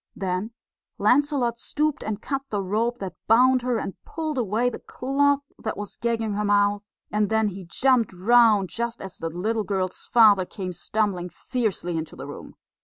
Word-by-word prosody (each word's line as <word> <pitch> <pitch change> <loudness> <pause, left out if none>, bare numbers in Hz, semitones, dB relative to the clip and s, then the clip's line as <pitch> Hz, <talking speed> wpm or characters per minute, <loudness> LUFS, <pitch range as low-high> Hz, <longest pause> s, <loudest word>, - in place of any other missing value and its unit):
Then 190 +2 -2 0.5
Lancelot 245 +1 +2
stooped 300 +3 -1
and 215 -1 -4
cut 275 -1 -2
the 205 -2 -1
rope 225 +5 0
that 190 -6 -5
bound 255 +3 +5
her, 245 -1 0
and 195 - -4
pulled 310 -4 -3
away 225 +2 +1
the 245 - -3
cloth 285 +2 +1 0.2
that 220 - -4
was 205 0 -6
gagging 230 -2 -1
her 210 +1 -1
mouth; 205 0 +2 0.3
and 210 -1 +1
then 220 -1 +2
he 190 -1 -8
jumped 250 +6 +2
round 210 +1 +4
just 235 0 -3
as 190 -1 -9
the 165 - -3
little 215 +7 -1
girl's 190 -2 -3
father 215 -5 +6
came 185 0 -6
stumbling 180 0 -1
fiercely 190 -3 -2
into 160 - -7
the - - -8
room. - - -10
215 Hz, 175 wpm, -25 LUFS, 195-245 Hz, 0.5 s, father